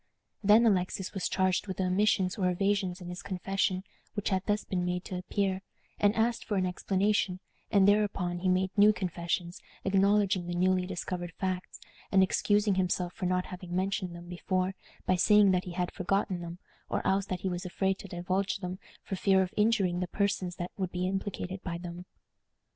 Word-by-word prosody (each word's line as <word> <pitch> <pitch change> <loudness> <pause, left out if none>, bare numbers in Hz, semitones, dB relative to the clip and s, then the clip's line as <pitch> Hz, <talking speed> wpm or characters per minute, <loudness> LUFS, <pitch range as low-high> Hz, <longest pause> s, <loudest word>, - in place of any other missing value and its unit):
Then 210 +4 +6
Alexis 190 -2 +1
was 195 - -1
charged 185 +1 +1
with 190 - -4
the 190 - 0
omissions 185 0 +2
or 185 -4 +1
evasions 195 0 0
in 175 - -7
his 180 0 -6
confession 195 0 -1 0.3
which 205 - -1
had 190 -2 0
thus 210 0 +1
been 180 -2 -1
made 180 0 -2
to 185 - -5
appear, 190 +1 -1 0.4
and 205 0 +3
asked 230 +1 +1
for 205 - -2
an 185 - +2
explanation, 190 +1 0 0.3
and 200 -1 +5
thereupon 200 -4 +2
he 185 +1 0
made 185 +1 +1
new 210 +1 +7
confessions, 175 -1 -3 0.2
acknowledging 195 -1 +3
the 175 - -3
newly 185 0 +2
discovered 175 -1 -4
facts, 185 0 -3 0.3
and 190 -1 +6
excusing 205 +2 +2
himself 180 -1 0
for 185 - -2
not 180 0 +1
having 180 -1 -7
mentioned 185 -1 -1
them 175 0 -10
before 185 +1 -1 0.3
by 185 - +2
saying 210 +1 +6
that 180 0 +1
he 180 - -6
had 180 0 -1
forgotten 190 -1 0
them, 170 0 -7 0.3
or - - -2
else 195 0 +2
that 185 -1 -3
he - - -2
was 180 -1 -2
afraid 190 +1 -1
to - - -8
divulge 185 +3 -1
them 185 -1 -5 0.2
for 195 - -4
fear 190 0 +3
of 185 - -5
injuring 210 -5 +2
the 180 - -1
persons 195 -2 -1
that 175 +1 -5
would 185 -3 -2
be 180 0 -2
implicated 190 0 -3
by 170 -2 -4
them. 175 0 -7
185 Hz, 190 wpm, -30 LUFS, 180-200 Hz, 0.4 s, new